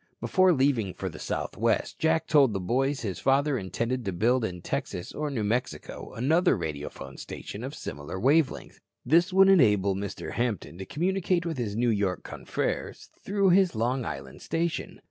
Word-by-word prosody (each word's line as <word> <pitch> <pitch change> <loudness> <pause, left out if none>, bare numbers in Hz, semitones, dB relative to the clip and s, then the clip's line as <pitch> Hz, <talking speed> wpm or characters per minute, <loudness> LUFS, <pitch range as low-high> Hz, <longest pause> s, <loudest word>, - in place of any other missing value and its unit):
Before 185 -1 +4
leaving 130 - +1
for - - -4
the - - -10
Southwest, - - -1
Jack 160 0 +2
told 140 -8 +4
the 95 - -1
boys 135 +9 0
his 100 -5 -4
father 140 +1 +2
intended 115 +5 -2
to 100 - -1
build 115 +7 +2
in 90 -5 -4
Texas 90 +1 -4
or 150 0 -3
New 125 -6 -2
Mexico 120 +5 -3
another 160 - +3
radiophone 75 -4 -6
station - - -7
of - - -5
similar 70 +6 -6
wave 140 +6 +4
length. - - -11 0.3
This 170 +8 +4
would 190 +1 +6
enable 105 - +5
Mr. 100 0 -5
Hampton 110 -7 -2
to 95 - -6
communicate 180 - 0
with 160 -5 -3
his 105 -4 -2
New 120 +1 +2
York 100 -3 -1
confreres - - -4
through 200 -1 +2
his 185 -5 +4
Long 120 +4 0
Island 70 - -7
station. 165 0 -2
125 Hz, 170 wpm, -27 LUFS, 100-160 Hz, 0.3 s, would